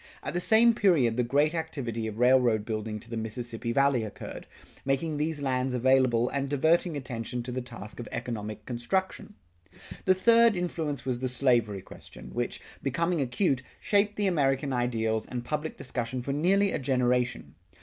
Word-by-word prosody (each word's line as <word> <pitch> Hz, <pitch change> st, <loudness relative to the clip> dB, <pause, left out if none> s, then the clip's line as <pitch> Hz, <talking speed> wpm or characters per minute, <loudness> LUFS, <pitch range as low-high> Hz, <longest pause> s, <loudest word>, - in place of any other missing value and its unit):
At -, -, -4 dB
the 175 Hz, -, 0 dB
same 230 Hz, +4 st, +6 dB
period 160 Hz, -, +3 dB
the 125 Hz, -, +1 dB
great 145 Hz, +6 st, +2 dB
activity 135 Hz, -9 st, -3 dB
of 110 Hz, -1 st, -6 dB
railroad 125 Hz, -3 st, +4 dB
building 110 Hz, -1 st, -3 dB
to 115 Hz, -, -15 dB
the -, -, -3 dB
Mississippi 115 Hz, +1 st, -4 dB
Valley 140 Hz, -2 st, +3 dB
occurred, 105 Hz, -, -8 dB, 0.4 s
making 145 Hz, +3 st, -1 dB
these 150 Hz, -1 st, -2 dB
lands 130 Hz, -1 st, 0 dB
available 125 Hz, -1 st, +3 dB
and 140 Hz, 0 st, -2 dB
diverting 160 Hz, +3 st, +2 dB
attention 125 Hz, -2 st, -4 dB
to 125 Hz, -, -5 dB
the 130 Hz, +1 st, -3 dB
task 115 Hz, -3 st, -10 dB
of 120 Hz, -, -6 dB
economic 110 Hz, -3 st, -5 dB
construction. 190 Hz, -, -2 dB, 0.7 s
The 185 Hz, -, +5 dB
third 230 Hz, +3 st, +5 dB
influence 160 Hz, -6 st, -3 dB
was 125 Hz, -2 st, -1 dB
the 130 Hz, 0 st, -1 dB
slavery 120 Hz, -6 st, +1 dB
question 60 Hz, -, -12 dB
which, -, -, -2 dB, 0.2 s
becoming 170 Hz, +4 st, 0 dB
acute, 135 Hz, +1 st, 0 dB, 0.2 s
shaped 205 Hz, 0 st, +1 dB
the 205 Hz, -, 0 dB
American 140 Hz, -6 st, +1 dB
ideals 115 Hz, -3 st, 0 dB
and 120 Hz, -1 st, -5 dB
public 150 Hz, +3 st, -3 dB
discussion 125 Hz, -1 st, -3 dB
for 140 Hz, -, -2 dB
nearly 195 Hz, +7 st, +2 dB
a -, -, -1 dB
generation. 125 Hz, -, 0 dB
130 Hz, 165 wpm, -28 LUFS, 120-160 Hz, 0.7 s, same